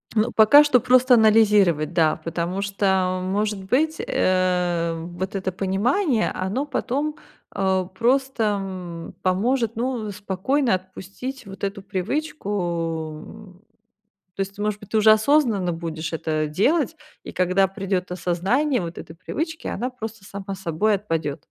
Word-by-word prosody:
Ну, 220 +3 +2
пока 255 +7 +7
что 260 -4 +4
просто 255 +1 +5
анализировать, 210 -8 +4
да, 160 -2 +3
потому 170 +3 -2
что, 190 -2 +1
может 205 +1 -1
быть, 305 +10 +1
э, 180 -2 +1
вот 180 +4 -5
это 190 -1 -2
понимание, 220 - +1
оно 200 +10 -2
потом, 290 +2 -2 0.4
а, 190 -1 0
просто, 240 +6 0 0.2
м, 180 -3 -7
поможет, 230 +5 +1
ну, 230 -3 -2
спокойно 210 +6 0
отпустить 195 +7 -8
вот 195 +1 -11
эту 200 0 -3
привычку, 205 - -3 0.8
м. 200 -3 -14 0.8
То - - -6
есть 195 0 -2
ты, 205 - -6
может 210 -1 -1
быть, 205 0 -13
ты 220 - +2
уже 215 0 +6
осознанно 220 - +3
будешь 165 -1 -5
это 155 -1 -1
делать, 275 - +1 0.3
и - - -8
когда 185 +2 +2
придёт 190 -2 -3
осознание 205 - 0
вот 170 -1 -6
этой 160 - -10
привычки, 320 - -5
она 250 +2 -2
просто 220 -4 -8
сама 195 0 -6
собой 190 +3 0
отпадёт. 165 -8 -2
195 Hz, 140 wpm, -23 LUFS, 185-235 Hz, 0.8 s, пока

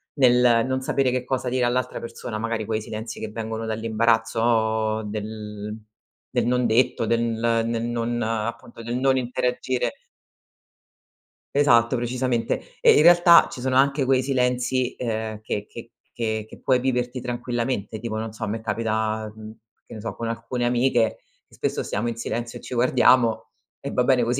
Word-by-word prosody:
nel 125 -3 +4
non 130 0 -1
sapere 130 -1 +1
che 125 0 -1
cosa 130 0 -2
dire 125 0 0
all'altra 125 +1 -1
persona, 115 -1 -6
magari 115 -1 -2
quei 110 +1 -2
silenzi 110 +1 -7
che 110 - -4
vengono 110 0 -4
dall'imbarazzo 110 0 +1
del 105 0 -6 0.6
del - - 0
non 125 +1 +1
detto, 115 0 +2
del 115 +1 +1
nel 115 0 0
non 120 0 -2
appunto, 115 +1 -4
del 120 +2 -3
non 135 +1 +3
interagire. 125 - -1 1.6
Esatto, 120 -4 +4
precisamente, 120 -1 -1 0.2
e, 460 -2 +7
in - - +5
realtà, 175 0 +7
ci 125 - -7
sono 130 0 0
anche 140 +1 +3
quei 130 0 +3
silenzi, 125 -1 0
ehm, 110 -3 -3
che 105 -1 -4
che 115 0 -11 0.2
che 110 -2 -2
che - - -13
puoi 130 -1 +2
viverti 125 0 -1
tranquillamente, 120 -3 -3
tipo, 110 -1 -4
non 110 0 -4
so, 110 - -7
a - - -1
me 110 +2 -3
capita, 110 0 -2
mhmm, 110 0 -9 0.3
che - - -12
ne 110 - -8
so, 115 - -5
con 115 -1 -4
alcune 115 +2 -3
amiche 120 -2 +2 0.3
che - - -27
spesso - - -2
stiamo 105 +4 -2
in 115 - -2
silenzio 120 0 -4
e - - -13
ci - - -7
guardiamo 120 -1 +3 0.3
e - - -6
va 125 - +2
bene 125 -1 +3
cos. 120 +3 0
115 Hz, 165 wpm, -24 LUFS, 110-125 Hz, 1.6 s, e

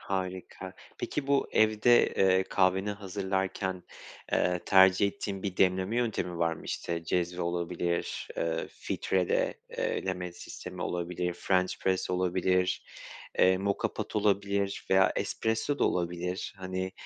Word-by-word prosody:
Harika. 95 -1 -4 0.3
Peki, 145 -2 -3
bu 140 0 +2
evde, 110 +2 +5
eee, 95 -1 +4
kahveni 95 +2 +2
hazırlarken, 95 -2 -2 0.5
eee, 90 0 +2
tercih 95 +1 +6
ettiğin 100 -1 -4
bir 95 -3 -3
demleme 95 +4 +2
yöntemi 110 -7 -1
var 85 -1 +2
mı? - - -12
İşte, 85 -1 -3
cezve 90 +1 -1
olabilir, 85 0 -2
eee, 80 0 -1
filtreleme 90 0 -2 0.5
olabilir, 90 0 -2
french 90 +1 0
press 95 -1 0
olabilir, 90 0 +1 0.6
eee, 95 0 +5
moka 100 0 -1
pot - - -5
olabilir 100 -1 0
veya 95 0 +5
espresso 115 +6 -1
da - - +3
olabilir. 90 +3 -2
Hani, 95 0 -4
95 Hz, 115 wpm, -29 LUFS, 90-100 Hz, 0.6 s, tercih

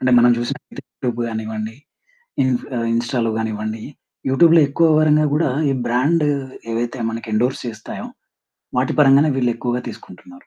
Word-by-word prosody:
అంటే, 130 - +1
మనం 120 +1 +6
జూసినట్లయితే 120 0 -6
యూట్యూబ్ 120 -2 -3
గానివ్వండి, 110 0 -5 0.7
ఇన్ 130 0 +2 0.4
ఇన్‌స్టాలో 120 0 0
గానివ్వండి, 110 0 -3 0.5
యూట్యూబ్‌లో 165 +4 +6
ఎక్కువ 165 +4 +3
ఎవరైనా 155 0 +4
గూడా 150 0 +2 0.2
ఈ - - +1
బ్రాండ్ 145 +7 +2 0.5
ఏవైతే 120 +2 -2
మనకి 115 +1 -6
ఎండోర్స్ 125 +5 0
చేస్తాయో, 110 -1 -7 0.7
వాటి 130 0 +1
పరంగానే 140 +2 +6
వీళ్ళు 125 -2 +1
ఎక్కువగా 120 +1 -2
తీసుకుంటున్నారు. 265 +1 -13
125 Hz, 130 wpm, -20 LUFS, 115-145 Hz, 0.7 s, మనం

